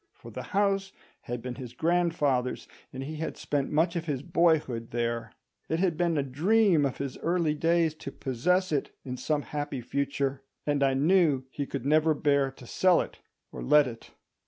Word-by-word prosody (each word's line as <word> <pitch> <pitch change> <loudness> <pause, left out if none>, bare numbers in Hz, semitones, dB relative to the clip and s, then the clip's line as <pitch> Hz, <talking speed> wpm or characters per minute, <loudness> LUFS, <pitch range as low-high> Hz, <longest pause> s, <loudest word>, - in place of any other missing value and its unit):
For - - -12
the - - -6 0.2
house 195 -1 +2 0.3
had 120 -1 -4
been 125 -1 -4
his 125 -2 -8
grandfather's, 155 -5 0 0.2
and 130 +1 -6
he 155 +3 -6
had 160 - -4
spent 140 -2 -1
much 165 +3 +2
of 165 -1 -2
his 140 -3 -2
boyhood 160 -9 +1
there; 115 -1 -2 0.4
it 160 - +1
had 175 -2 +1
been 170 -1 +1
a 140 - +2
dream 165 - +3
of 130 - -6
his 140 -2 -5
early 170 -2 +1
days 165 +1 +2
to - - -7
possess 180 +9 0
it 145 -3 0 0.2
in 125 -1 -4
some 145 +3 -1
happy 145 -2 -4
future, 140 +1 -2 0.2
and 145 -1 +1
I 135 -1 +3
knew 150 -2 +3
he 140 0 -4
could 115 - -5
never 155 +2 +3
bear 140 -2 +2
to 130 -1 -14
sell 180 +7 +3 0.4
or - - -7
let 150 +1 +5
it. 115 -3 -8
145 Hz, 180 wpm, -28 LUFS, 130-170 Hz, 0.4 s, let